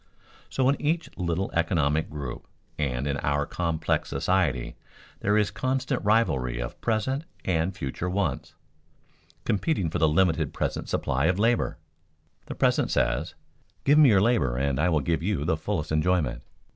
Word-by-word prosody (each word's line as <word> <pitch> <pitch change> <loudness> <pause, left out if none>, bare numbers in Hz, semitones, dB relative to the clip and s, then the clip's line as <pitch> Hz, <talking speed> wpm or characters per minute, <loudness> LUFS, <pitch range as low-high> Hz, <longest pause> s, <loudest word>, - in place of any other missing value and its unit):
So 130 -1 +1
in 140 - +1
each 160 +3 -1
little 90 +2 -2
economic 80 -3 +1
group 70 -5 -6 0.3
and 65 -3 -1
in 70 -1 -1
our 70 0 0
complex 85 -1 -1
society 80 -10 0 0.4
there 105 +2 +2
is 105 -1 +2
constant 130 0 -1
rivalry 70 - +2
of - - -6
present 120 +6 0 0.2
and 85 0 +1
future 70 +7 -4
wants, 80 -5 -2 0.9
competing 100 - 0
for - - -1
the 80 0 +4
limited 80 -2 +1
present - - -2
supply 70 +3 0
of 90 +1 +2
labor. 115 +3 +1 0.7
The - - -6
present - - +2
says, 65 +7 0 0.5
"Give 145 +2 +5
me 150 -4 +8
your 100 -4 +5
labor 100 - +2
and 70 0 0
I 85 +4 +3
will 80 -3 +2
give 80 +3 0
you 90 -5 -1
the 80 - +2
fullest 80 0 -3
enjoyment." 75 -3 +1
85 Hz, 155 wpm, -26 LUFS, 70-105 Hz, 0.9 s, me